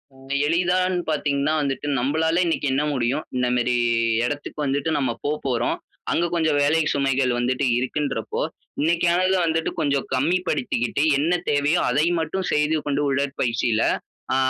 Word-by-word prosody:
ம். 135 0 -16 0.2
எளிதான்னு 180 +2 +1
பார்த்தீங்கனா, 145 0 0
வந்துட்டு 140 +1 -2
நம்பளால 160 +6 +1
இன்னைக்கு 165 -3 0
என்ன 145 +3 +1
முடியும்? 130 +3 0
இந்தமாரி 125 0 +1 0.5
எடத்துக்கு 145 +2 -5
வந்துட்டு, 140 +3 -1
நம்ம 130 -4 0
போ 145 - 0 0.2
போறோம், 120 -2 0 0.3
அங்க 170 - +1
கொஞ்ச 160 -2 +2
வேலை 150 +3 +3
சுமைகள் 135 -2 +1
வந்துட்டு 130 +3 0
இருக்குன்றபோ, 140 +3 -2 0.4
இன்னைக்கானத 175 +4 +2
வந்துட்டு, 160 0 0
கொஞ்சம் 140 -3 0
கம்மி 160 +8 +2
படுத்திக்கிட்டு, 120 +3 -1
என்ன 160 +5 +1 0.2
தேவையோ, 145 +4 +2
அதை 145 +5 +2
மட்டும் 180 +4 -2
செய்து 150 +1 +2
கொண்டு, 145 0 0
உடற்பயிற்சியில 125 -4 0 0.5
ஆ - - +2
145 Hz, 135 wpm, -23 LUFS, 130-160 Hz, 0.5 s, வேலை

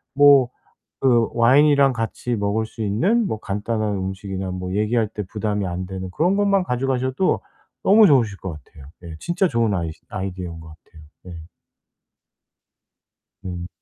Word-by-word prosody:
뭐 140 -3 +6 0.5
그 120 -4 +3
와인이랑 140 +3 +4
같이 120 +1 -3
먹을 105 +2 -1
수 110 +1 -10
있는 180 - +1
뭐 110 - -3
간단한 105 +1 -2
음식이나 95 0 -4
뭐 90 0 -5
얘기할 110 +1 +1
때 105 -2 -5
부담이 105 -2 -2
안 90 +1 -4
되는 95 0 -6
그런 180 - +1
것만 200 -2 +2
가져 125 -3 -2
가셔도 130 +7 0 0.4
너무 215 +2 +6
좋으실 115 -9 +3
것 95 - -5
같아요. 70 -3 -16 0.2
네 85 -2 -9
진짜 180 +2 +1
좋은 115 - 0
아이 85 -3 -2 0.2
아이디어인 95 -5 -5
것 80 - -12
같아요 80 0 -17 0.2
네. 90 -2 -9 2.0
네. 90 -2 -6
110 Hz, 295 characters per minute, -22 LUFS, 95-130 Hz, 2.0 s, 뭐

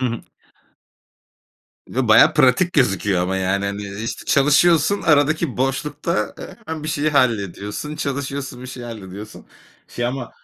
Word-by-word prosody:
Hı 130 - +1
hı. 115 -1 -3 1.7
Bir - - -12
de - - 0
bayağı - - +6
pratik 180 -2 +3
gözüküyor 100 - +1
ama, 95 +1 -1
yani, 95 +1 0
hani, 100 +1 -4
işte, 100 +3 -6
çalışıyorsun, 160 +6 +3
aradaki 150 -3 +2
boşlukta, 135 - -2
eee, - - -9
hemen 160 -1 -5
bir 155 - -4
şeyi 155 0 0
hallediyorsun, 115 - -1
çalışıyorsun, 140 -2 -4
bir - - -7
şeyi 125 -1 -8
hallediyorsun. 105 -2 -9 0.4
Şey 120 - -3
ama, 125 -1 -4
130 Hz, 145 wpm, -20 LUFS, 105-150 Hz, 1.7 s, bayağı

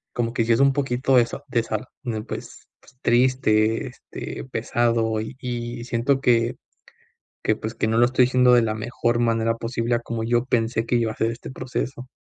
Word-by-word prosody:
como 115 -1 -1
que 120 -1 +1
si 115 - +2
es 115 - +3
un 140 0 +5
poquito 135 -1 +1
de 125 - +7
eso, 120 +4 -6
de 120 -3 +1
sal, 110 -2 -4 0.2
¿no? 115 -4 -3
Pues, - - -8
pues 125 - -22
triste, 120 -2 +2
este, 125 - -8
pesado, 115 -2 0
y 110 +4 -6
y 120 -1 -4
siento 125 +3 +1
que 120 -2 +2 0.9
que, 110 - +2
pues, 110 +2 -6
que - - 0
no 110 - +1
lo 120 +1 +6
estoy 125 0 +3
haciendo 125 0 +5
de 120 - +5
la 110 -1 0
mejor 120 +1 -1
manera 115 -1 +1
posible 115 0 -1
a 120 - +1
como 115 -1 -4
yo 120 +1 +1
pensé 115 -2 0
que 120 - +1
iba 115 -2 +1
a - - -14
ser 115 - +1
este 115 - -8
proceso. 130 0 -4
120 Hz, 205 wpm, -23 LUFS, 115-125 Hz, 0.9 s, de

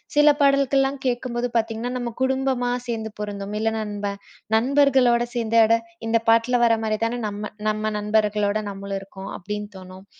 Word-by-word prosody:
சில 295 0 +6
பாடல்கள்லாம் 275 -1 +3
கேட்கும்போது 245 -1 -1
பார்த்தீங்கன்னா, 225 +1 -1
நம்ம 240 -2 -4
குடும்பமா 265 -1 +1 0.2
சேர்ந்து 225 -2 -3
பொருந்தும். 205 -1 -5
இல்ல 225 +1 +1
நண்ப 205 -1 -4 0.5
நண்பர்களோட 255 -1 +4
சேர்ந்து, 230 -1 0
"அட 225 +1 +4 0.3
இந்த 230 0 +3
பாட்ல 230 +2 +4
வரமாரிதான 230 +1 0
நம்ம 210 +1 -5 0.2
நம்ம 215 0 -1
நண்பர்களோட 210 -1 +1
நம்மளும் 195 0 -5
இருக்கோம்". 195 0 -9
அப்பிடின்னு 210 +2 -6
தோணும். 185 +1 -12
225 Hz, 135 wpm, -23 LUFS, 210-245 Hz, 0.5 s, சில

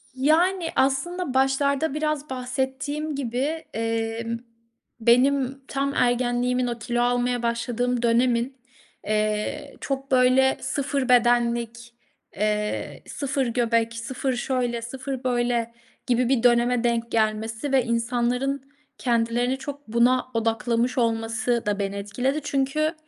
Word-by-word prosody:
Yani, 330 +6 +2
aslında 275 +4 0
başlarda 270 +2 +2
biraz 305 -1 -2
bahsettiğim 265 +4 -3
gibi, 275 +5 -2
emm, 225 0 -2 0.6
benim 260 +3 +3
tam 275 0 -1
ergenliğimin, 245 0 +1
o 240 -1 -3
kilo 240 +2 -1
almaya 245 0 +1
başladığım 240 +1 -1
dönemin, 240 +2 +2 0.5
eee, 215 0 -1
çok, 275 0 -4
böyle, 260 +1 +4
sıfır 275 -2 -1
bedenlik, 235 -1 +2 0.4
eee, 210 +1 -2
sıfır 275 -1 -1
göbek, 230 -1 +1
sıfır 250 +3 -3
şöyle, 245 -1 -1
sıfır 260 +2 -5
böyle 240 -2 0 0.4
gibi 245 0 +2
bir 260 -3 +2
döneme 240 0 +3
denk 235 -1 0
gelmesi 220 +4 0
ve 265 -2 +4
insanların 245 +3 0 0.4
kendilerini 240 +1 +1
çok 285 +1 -8
buna 235 +3 +3
odaklamış 230 +2 0
olması 230 +1 0
da 205 -1 0
beni 200 0 -2
etkiledi 245 +9 -1
çünkü, 285 +3 0
245 Hz, 110 wpm, -24 LUFS, 235-270 Hz, 0.6 s, böyle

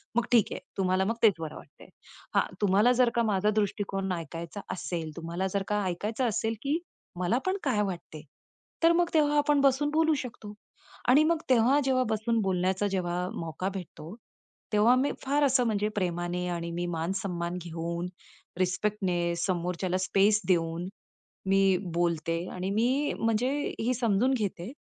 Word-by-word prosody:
मग 240 - +3
ठीक 230 -4 +6
आहे - - -4 0.2
तुम्हाला 190 0 +2
मग 225 - 0
तेच 215 -3 +7
बरं 160 -2 -5
वाटतंय. - - -14 0.5
हा - - +4 0.2
तुम्हाला 205 +4 +4
जर 250 - +5
का 235 - +3
माझा 210 -1 +2
दृष्टिकोन 195 -2 -1
ऐकायचा 170 +3 -6
असेल, 170 -3 -4
तुम्हाला 170 +3 -3
जर 200 -1 0
का 210 0 +1
ऐकायचं 210 +8 -2
असेल, 225 +1 -1
की 285 +3 +1 0.4
मला 185 +7 +1
पण 375 +1 +1
काय 245 -8 +1
वाटते? 175 -5 -6 0.6
तर 330 - +7
मग 345 0 +2
तेव्हा 295 -2 +3
आपण 290 -1 +3
बसून 275 +2 +3
बोलू 320 +1 +3
शकतो. 210 -3 -9 0.6
आणि 280 +5 +7
मग 330 +1 +3
तेव्हा 255 +3 +5
जेव्हा 260 -1 +2
बसून 220 +1 0
बोलण्याचा 190 +1 0
जेव्हा 180 -2 -2
मौका 165 +3 -3
भेटतो, 180 -1 -8 0.6
तेव्हा 215 +4 +5
मी 265 +3 +1
फार 285 +2 +1
असं 260 -2 +3
म्हणजे 210 -2 0
प्रेमाने 175 -1 -1
आणि 170 -1 -3
मी 175 +1 -2
मान-सम्मान 175 0 -2
घेऊन, 170 +1 -4 0.5
रिस्पेक्टने, 185 -2 0
समोरच्याला 180 +1 -1
स्पेस 205 +3 +3
देऊन, 170 -1 +1 0.6
मी 195 -1 +4 0.2
बोलते 165 -1 0 0.2
आणि 185 +1 -3
मी 250 +7 +1
म्हणजे 225 +3 +1 0.3
ही 245 +3 +1
समजून 235 +1 +2
घेते, 205 -4 -3
195 Hz, 155 wpm, -28 LUFS, 175-240 Hz, 0.6 s, तेच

